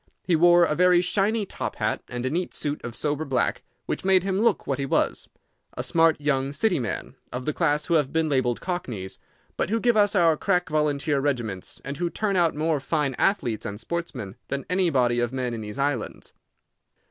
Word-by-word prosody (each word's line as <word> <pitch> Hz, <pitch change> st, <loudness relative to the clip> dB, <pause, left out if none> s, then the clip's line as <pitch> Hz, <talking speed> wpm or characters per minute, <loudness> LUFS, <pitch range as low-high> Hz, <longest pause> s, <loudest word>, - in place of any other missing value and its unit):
He 175 Hz, -, +2 dB
wore 175 Hz, +1 st, +6 dB
a 155 Hz, -, 0 dB
very 180 Hz, +2 st, +5 dB
shiny 205 Hz, +4 st, +1 dB
top -, -, -5 dB
hat -, -, -1 dB
and 120 Hz, +1 st, -4 dB
a 130 Hz, -, -1 dB
neat 175 Hz, +3 st, -2 dB
suit 145 Hz, 0 st, -3 dB
of 120 Hz, -1 st, -6 dB
sober 150 Hz, +1 st, -1 dB
black, 135 Hz, -4 st, 0 dB, 0.2 s
which -, -, -3 dB
made 190 Hz, -1 st, +4 dB
him 190 Hz, 0 st, 0 dB
look 225 Hz, -1 st, +2 dB
what 135 Hz, -1 st, -2 dB
he 140 Hz, -, -1 dB
was—a -, -, -3 dB
smart 165 Hz, -1 st, +3 dB
young 140 Hz, -2 st, 0 dB
City 200 Hz, 0 st, +1 dB
man, 115 Hz, -4 st, -4 dB
of 125 Hz, 0 st, -5 dB
the 150 Hz, -, 0 dB
class 150 Hz, +1 st, +1 dB
who 170 Hz, -, -1 dB
have 150 Hz, -4 st, +2 dB
been 160 Hz, 0 st, +1 dB
labeled 130 Hz, -4 st, 0 dB
cockneys, 120 Hz, -, -5 dB, 0.4 s
but -, -, 0 dB
who 225 Hz, +2 st, +1 dB
give 240 Hz, 0 st, +2 dB
us 205 Hz, -1 st, +3 dB
our 165 Hz, -4 st, +5 dB
crack 180 Hz, +1 st, 0 dB
volunteer 150 Hz, -1 st, +1 dB
regiments, 120 Hz, -7 st, -3 dB
and 140 Hz, +1 st, -5 dB
who 175 Hz, 0 st, -1 dB
turn 205 Hz, +2 st, -1 dB
out 170 Hz, -4 st, +2 dB
more 155 Hz, 0 st, 0 dB
fine 145 Hz, -1 st, -1 dB
athletes 125 Hz, -, +1 dB
and 100 Hz, +1 st, -5 dB
sportsmen 125 Hz, -, -5 dB
than 140 Hz, 0 st, -3 dB
any 180 Hz, -1 st, +3 dB
body 125 Hz, -5 st, +2 dB
of 120 Hz, 0 st, 0 dB
men 130 Hz, -2 st, -2 dB
in 115 Hz, -, -4 dB
these 105 Hz, +2 st, -7 dB
islands. 140 Hz, -4 st, -2 dB
150 Hz, 205 wpm, -25 LUFS, 130-175 Hz, 0.4 s, wore